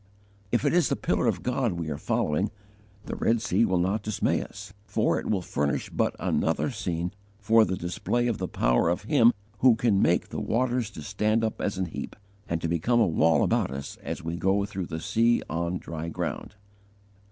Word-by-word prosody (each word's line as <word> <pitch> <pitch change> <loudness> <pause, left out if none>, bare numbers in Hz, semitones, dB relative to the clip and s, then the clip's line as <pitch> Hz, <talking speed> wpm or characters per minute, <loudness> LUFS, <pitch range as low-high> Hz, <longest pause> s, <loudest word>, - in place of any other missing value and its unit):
If 120 +4 +1
it 145 - +3
is 175 -1 +3
the - - +1
Pillar - - 0
of - - 0
God 125 -4 0
we 85 -2 -4
are 70 - -3
following, 75 +7 0 0.6
the - - -4
Red 115 +1 +2
Sea 115 +1 +2
will 95 -4 +1
not 95 +5 +1
dismay 105 -1 0
us, 100 - -9
for 105 +2 +1
it - - -5
will 95 -4 0
furnish 70 -3 -1
but - - 0
another 80 - 0
scene 90 -6 -3 0.3
for 110 +1 +4
the 95 - -2
display 90 +7 -1
of 115 -3 -1
the 95 - -2
power - - +2
of 90 +2 -1
Him 120 0 +5 0.3
who 125 -3 +6
can 110 -4 +2
make 85 - +2
the - - -4
waters 120 -1 0
to 80 -7 -9
stand 105 +5 0
up 110 - -2
as 100 -2 -1
an 95 - 0
heap, 85 - -6 0.3
and 85 - 0
to - - -1
become 85 +9 +1
a 115 - +5
wall 80 -3 +3
about - - +1
us 70 +1 -6
as - - -6
we 85 +1 -3
go 95 +2 +1
through 95 -3 -5
the 80 -1 -4
sea 115 +7 +2
on 85 +2 -2
dry 80 -1 -6
ground. 95 - -4
100 Hz, 205 wpm, -27 LUFS, 85-115 Hz, 0.6 s, who